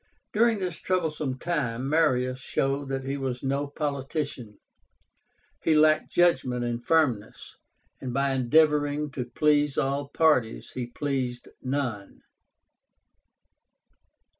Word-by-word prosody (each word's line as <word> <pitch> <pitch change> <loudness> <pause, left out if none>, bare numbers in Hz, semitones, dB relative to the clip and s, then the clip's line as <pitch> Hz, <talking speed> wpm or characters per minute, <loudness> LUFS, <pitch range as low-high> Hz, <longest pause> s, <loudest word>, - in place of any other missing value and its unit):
During 230 +1 +3
this 180 -4 -3
troublesome 155 -7 -1
time, 130 -7 -2
Marius 130 -5 +2
showed 135 +1 -1
that 135 0 -2
he 135 +1 -3
was 130 -2 -3
no 140 +2 -1
politician. 140 -5 -4 1.0
He 160 - +3
lacked 155 0 +4
judgment 130 -8 +2
and 120 0 -3
firmness, 140 -11 0 0.5
and 130 - -4
by 140 +2 +1
endeavoring 145 +2 +2
to 130 -3 -4
please 145 +2 +2
all 140 0 0
parties 145 -8 +1
he 125 -2 -4
pleased 125 -2 -3
none. 130 -7 -3
140 Hz, 110 wpm, -27 LUFS, 125-150 Hz, 1.0 s, lacked